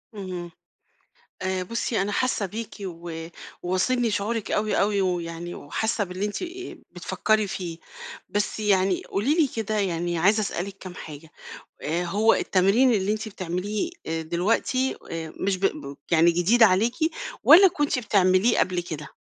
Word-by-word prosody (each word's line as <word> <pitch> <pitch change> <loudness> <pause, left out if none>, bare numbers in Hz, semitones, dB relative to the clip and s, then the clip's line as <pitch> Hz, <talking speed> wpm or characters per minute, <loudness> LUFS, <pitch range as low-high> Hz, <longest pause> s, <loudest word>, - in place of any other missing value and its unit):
اهم. 180 -3 -6 0.9
آآ، 185 0 -1
بُصي 230 +1 -1
أنا 205 +1 -1
حاسة 240 -2 0
بيكِ 220 +3 -6
و 165 -3 -6 0.4
واصلني 225 +6 +1
شعورِك 215 +2 -2
أوي، 215 0 +1
أوي، 200 -1 +2
ويعني 175 -1 -3
وحاسة 215 +8 -2
باللي 185 +2 -4
أنتِ 210 - -4 0.5
بتفكري 215 -1 0
فيه. 170 -3 -5 0.5
بس 205 +1 -1
يعني 190 -3 +2
قولي 250 +11 0
لي 315 -5 +4
كده 215 -1 -1
يعني 175 -2 -1
عايزة 205 +6 +3
أسألِك 195 0 -4
كام 180 -1 -9
حاجة. 155 0 -10 0.5
آآ، 170 +4 -1
هو 210 +6 +3
التمرين 200 +7 +3
اللي 205 0 +1
أنتِ 215 +1 -3
آآ - - -6
بتعمليه 190 - -3 0.3
دلوقتي 210 +10 0
آآ 160 -1 -5
مش 195 0 +1
ب 140 -7 -2
يعني 170 +1 +5
جديد 185 +8 +3
عليكِ 220 +4 +5 0.5
والّا 380 +4 +9
كنتِ 295 -5 0
بتعمليه 200 0 +3
قبل 180 -1 +1
كده؟ 155 -3 -7
195 Hz, 145 wpm, -25 LUFS, 175-215 Hz, 0.9 s, والّا